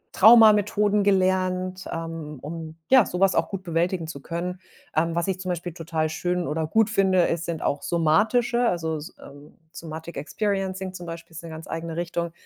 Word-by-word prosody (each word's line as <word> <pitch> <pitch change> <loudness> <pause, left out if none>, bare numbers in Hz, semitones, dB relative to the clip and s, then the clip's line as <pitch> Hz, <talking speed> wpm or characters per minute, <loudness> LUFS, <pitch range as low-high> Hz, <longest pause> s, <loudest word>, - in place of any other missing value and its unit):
Trauma-Methoden 210 -1 +6
gelernt, 185 -1 +1
ähm, 165 -2 -5
um, 160 +1 -7
ja, 260 -2 +7
so 180 - -5
was 195 0 +4
auch - - +1
gut 195 -2 -5
bewältigen 170 0 -1
zu 155 -3 -7
können. 175 +4 -4 0.4
Ähm, 165 +2 +1
was 170 +1 0
ich 190 -1 -1
zum 185 -1 -5
Beispiel 175 -1 -3
total 160 -1 -2
schön 175 +3 -2
oder 155 +1 -2
gut 220 +6 +2
finde, 190 -4 +3
es 165 0 -2
sind 165 -2 -4
auch 140 - 0
somatische, 215 - +2
also, 160 -2 -2
s 155 +5 -8
ähm, 145 +1 -14 0.2
Somatic 165 +1 -8
Experiencing 190 +3 -2
zum 175 -2 -8
Beispiel 165 +1 -8
ist 165 - -8
'ne 165 - -8
ganz 160 0 -9
eigene 165 0 -5
Richtung. 170 0 -3
175 Hz, 185 wpm, -25 LUFS, 165-190 Hz, 0.4 s, ja